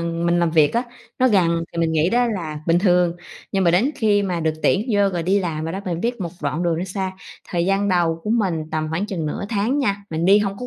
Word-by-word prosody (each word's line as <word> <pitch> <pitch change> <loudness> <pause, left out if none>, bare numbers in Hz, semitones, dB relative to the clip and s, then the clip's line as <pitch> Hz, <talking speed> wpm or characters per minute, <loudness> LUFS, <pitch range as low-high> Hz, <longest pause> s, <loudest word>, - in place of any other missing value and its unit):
mình 170 +1 0
làm 170 -1 +2
việc 155 0 +3
á, 235 - +2 0.4
nó 255 0 +4
gần 170 -5 +2
thì 170 - -6
mình 165 -1 +1
nghĩ 160 +3 +2
đó 245 +1 +3
là 165 -9 -4
bình 170 +1 +4
thường, 180 -2 +2 0.4
nhưng 195 -1 +1
mà 170 - +5
đến 200 +11 +3
khi 205 -2 +2
mà 180 -3 -2
được 160 -1 +1
tuyển 210 +6 +2
vô 205 -1 +3
rồi 175 -2 -2
đi 195 +4 +2
làm 160 -4 -3
rồi 165 - -3
đó 195 - -4
mình 175 -2 -3
biết 240 -1 -2
một 170 -3 -3
đoạn 150 +4 -1
đường 170 -2 0
nó 175 - -2
xa. 190 0 -3 0.4
Thời 175 0 -1
gian 195 +1 +1
đầu 170 -3 +1
của 210 - -2
mình 175 -9 0
tầm 155 0 -1
khoảng 170 +6 -1
chừng 180 -7 -3
nửa 150 - -3
tháng 225 +6 0
nha, 200 -7 -1
mình 160 +1 -2
đi 200 +3 +6
hông 200 -1 -2
có 250 - -5
180 Hz, 270 wpm, -21 LUFS, 165-200 Hz, 0.4 s, đi